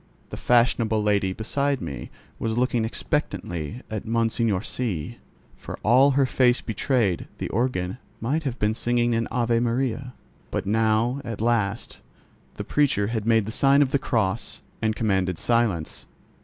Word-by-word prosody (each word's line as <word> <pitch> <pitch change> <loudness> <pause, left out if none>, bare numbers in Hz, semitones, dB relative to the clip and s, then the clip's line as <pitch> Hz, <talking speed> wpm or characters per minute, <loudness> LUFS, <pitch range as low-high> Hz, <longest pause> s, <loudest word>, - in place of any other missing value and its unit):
The - - -4
fashionable 115 -3 +2
lady 100 -2 +2
beside 140 +7 -1
me 70 - -6 0.3
was 115 0 -2
looking 120 -2 +1
expectantly 85 - -3
at 110 -2 -3
Monseigneur 115 -3 0
C——. 105 -14 -3 0.4
For - - -8
all 130 +5 +6
her 140 - +5
face 125 -1 +3
betrayed, 110 -4 0
the - - -4
organ 115 -4 -1 0.2
might 140 +8 0
have 135 -5 -3
been 105 +1 +1
singing 120 +1 +1
an 115 0 0
Ave 120 -1 +1
Maria. 125 +1 -1 0.3
But - - -3
now, 110 +5 +1
at 115 -4 -5
last, 115 -2 -1 0.5
the - - -5
preacher 140 -8 +2
had 110 -1 -2
made 115 -2 +4
the 110 - -4
sign 140 +4 +4
of 135 - -3
the 140 - +2
cross, 110 -7 -1 0.2
and 110 -1 +1
commanded 95 -5 0
silence. 115 -9 0
115 Hz, 150 wpm, -24 LUFS, 105-125 Hz, 0.5 s, all